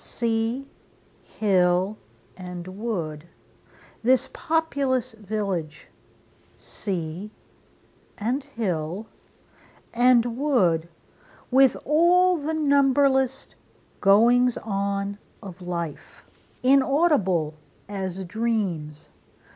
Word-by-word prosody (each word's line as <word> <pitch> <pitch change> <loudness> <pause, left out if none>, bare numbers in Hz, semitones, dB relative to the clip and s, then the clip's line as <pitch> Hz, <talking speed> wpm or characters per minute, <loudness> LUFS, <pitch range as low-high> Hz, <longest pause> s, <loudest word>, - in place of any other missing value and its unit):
Sea, 230 +3 -2 0.5
hill, 185 -1 +1 0.4
and 180 -1 -8
wood, 175 -7 -4 0.7
This 260 +2 +2
populous 280 -6 0
village! 200 -7 -4 0.7
Sea, 180 0 -5 0.9
and 245 +6 -1
hill, 195 - -3 0.9
and 240 -1 +4
wood, 180 - +2 0.6
With 265 0 +5
all 350 +4 +4
the 310 +2 -2
numberless 275 -3 +2 0.5
goings 235 +5 +4
on 200 -1 -3 0.2
of 190 -3 -11
life, 170 -4 -6 0.4
Inaudible 265 - +3 0.3
as 190 -2 -4
dreams! 185 -8 -3
220 Hz, 70 wpm, -24 LUFS, 180-265 Hz, 0.9 s, With